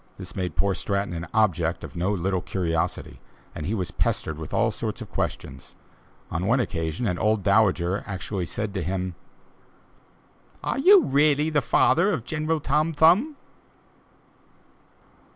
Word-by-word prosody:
This -, -, -9 dB
made 90 Hz, -5 st, -3 dB
poor 100 Hz, -1 st, +1 dB
Stratton 100 Hz, -1 st, -2 dB
an 85 Hz, 0 st, -5 dB
object 90 Hz, -7 st, +1 dB
of -, -, -9 dB
no 90 Hz, +4 st, 0 dB
little 95 Hz, -1 st, -1 dB
curiosity, 85 Hz, -2 st, -2 dB, 0.3 s
and 75 Hz, -, -6 dB
he 110 Hz, -, -1 dB
was 95 Hz, -4 st, -3 dB
pestered 80 Hz, 0 st, -1 dB
with 80 Hz, -, -7 dB
all -, -, +2 dB
sorts -, -, -4 dB
of -, -, -9 dB
questions; -, -, -5 dB, 0.6 s
on 90 Hz, +3 st, -2 dB
one 125 Hz, +4 st, +3 dB
occasion 80 Hz, -2 st, -2 dB
an 90 Hz, -5 st, -1 dB
old 110 Hz, -2 st, +1 dB
dowager 100 Hz, -2 st, +2 dB, 0.4 s
said 105 Hz, +4 st, -4 dB
to 95 Hz, -, -2 dB
him: 90 Hz, +1 st, -3 dB, 1.5 s
"Are -, -, -1 dB
you 375 Hz, +5 st, +7 dB
really 150 Hz, +2 st, +2 dB
the 150 Hz, -2 st, +2 dB
father 170 Hz, +8 st, +3 dB
of 130 Hz, -, -3 dB
General 160 Hz, 0 st, -1 dB
Tom 150 Hz, +3 st, 0 dB
Thumb?" 180 Hz, -, +4 dB
100 Hz, 145 wpm, -25 LUFS, 90-145 Hz, 1.5 s, you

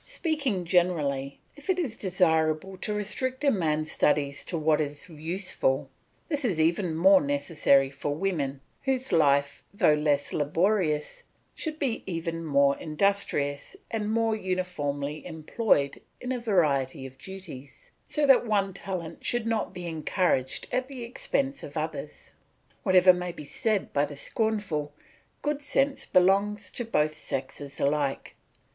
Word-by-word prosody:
Speaking 290 Hz, -, -1 dB
generally, 150 Hz, -7 st, +1 dB, 0.2 s
if 290 Hz, +6 st, -14 dB
it 375 Hz, -, +3 dB
is 285 Hz, -11 st, -2 dB
desirable 175 Hz, -2 st, +1 dB
to 210 Hz, -, -3 dB
restrict 255 Hz, +6 st, -2 dB
a 280 Hz, -, +5 dB
man's 155 Hz, -, 0 dB
studies 145 Hz, -1 st, +1 dB
to 170 Hz, -, -3 dB
what 155 Hz, 0 st, +2 dB
is 145 Hz, +4 st, -4 dB
useful, 160 Hz, -5 st, -2 dB, 0.4 s
this 295 Hz, -3 st, -1 dB
is 195 Hz, -10 st, 0 dB
even 165 Hz, +1 st, +2 dB
more 190 Hz, +4 st, +6 dB
necessary 140 Hz, -1 st, +2 dB
for 145 Hz, +1 st, -3 dB
women, 145 Hz, -6 st, -2 dB, 0.2 s
whose 265 Hz, -2 st, -1 dB
life, 140 Hz, -4 st, +3 dB
though 200 Hz, -6 st, +4 dB
less 150 Hz, -2 st, +1 dB
laborious, 155 Hz, 0 st, +1 dB, 0.3 s
should 310 Hz, -1 st, -4 dB
be 265 Hz, -7 st, -1 dB
even 165 Hz, -2 st, -3 dB
more 140 Hz, -2 st, +3 dB
industrious 155 Hz, -, 0 dB, 0.2 s
and 215 Hz, -2 st, -1 dB
more 225 Hz, 0 st, +2 dB
uniformly 155 Hz, -7 st, -3 dB
employed 160 Hz, -2 st, 0 dB, 0.2 s
in 250 Hz, -, -4 dB
a 255 Hz, -, -1 dB
variety 145 Hz, -, +1 dB
of 130 Hz, 0 st, -11 dB
duties, 185 Hz, -8 st, -10 dB, 0.2 s
so 300 Hz, -2 st, +1 dB
that 265 Hz, -3 st, +5 dB
one 200 Hz, -3 st, +1 dB
talent 180 Hz, -4 st, -6 dB
should 240 Hz, -2 st, 0 dB
not 225 Hz, -1 st, 0 dB
be 180 Hz, -2 st, -7 dB
encouraged 160 Hz, -4 st, 0 dB
at 255 Hz, 0 st, 0 dB
the 260 Hz, -3 st, -7 dB
expense 270 Hz, +3 st, -1 dB
of -, -, -8 dB
others. -, -, -5 dB, 0.5 s
Whatever 185 Hz, -1 st, +6 dB
may 180 Hz, 0 st, -3 dB
be 150 Hz, -3 st, -9 dB
said 215 Hz, -, -1 dB
by 145 Hz, +1 st, +3 dB
the 145 Hz, 0 st, -8 dB
scornful, 180 Hz, -5 st, -1 dB, 0.5 s
good 295 Hz, -1 st, -1 dB
sense 275 Hz, -1 st, 0 dB
belongs 195 Hz, +2 st, +3 dB
to 240 Hz, -, -4 dB
both 155 Hz, -9 st, +1 dB
sexes 140 Hz, -1 st, -5 dB
alike. 140 Hz, -1 st, 0 dB
175 Hz, 140 wpm, -27 LUFS, 145-215 Hz, 0.5 s, more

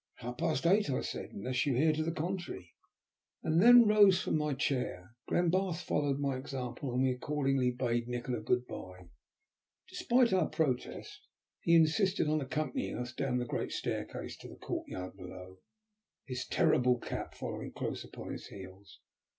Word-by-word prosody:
"At -, -, -15 dB
half 125 Hz, +1 st, -5 dB
past 160 Hz, -4 st, 0 dB
eight," 200 Hz, +3 st, +4 dB
I 130 Hz, -, 0 dB
said, -, -, -5 dB
"unless 125 Hz, +5 st, -1 dB
you 135 Hz, -, +2 dB
hear 155 Hz, +5 st, +4 dB
to 155 Hz, -, -1 dB
the 160 Hz, +1 st, -1 dB
contrary," 170 Hz, -, -4 dB, 0.7 s
and 160 Hz, +2 st, +3 dB
then 240 Hz, +2 st, +9 dB
rose 205 Hz, -3 st, +6 dB
from -, -, -1 dB
my 150 Hz, -2 st, 0 dB
chair. 125 Hz, -, -2 dB, 0.2 s
Glenbarth 175 Hz, 0 st, +1 dB
followed 145 Hz, -2 st, 0 dB
my 140 Hz, -2 st, -1 dB
example, 130 Hz, -1 st, -5 dB
and 125 Hz, +2 st, +1 dB
we 130 Hz, -, +3 dB
accordingly 135 Hz, -1 st, 0 dB
bade 120 Hz, -1 st, -1 dB
Nikola 120 Hz, -1 st, -3 dB
good 125 Hz, +3 st, +1 dB
bye. 90 Hz, -5 st, -9 dB, 0.8 s
Despite 240 Hz, -3 st, +2 dB
our 180 Hz, -4 st, +2 dB
protest, 130 Hz, -6 st, -2 dB, 0.3 s
he 170 Hz, -, +3 dB
insisted 165 Hz, +3 st, +3 dB
on 155 Hz, 0 st, +1 dB
accompanying 145 Hz, 0 st, -2 dB
us 120 Hz, 0 st, -5 dB
down 125 Hz, 0 st, -1 dB
the 125 Hz, -, -1 dB
great -, -, -3 dB
staircase -, -, -4 dB
to -, -, -11 dB
the -, -, -11 dB
courtyard 90 Hz, +1 st, -5 dB
below, 90 Hz, 0 st, -10 dB, 0.7 s
his 125 Hz, -1 st, -4 dB
terrible 125 Hz, 0 st, +3 dB
cat -, -, -6 dB
following -, -, -5 dB
close -, -, -4 dB
upon -, -, -8 dB
his -, -, -7 dB
heels. 95 Hz, 0 st, -12 dB
135 Hz, 165 wpm, -32 LUFS, 120-160 Hz, 0.8 s, then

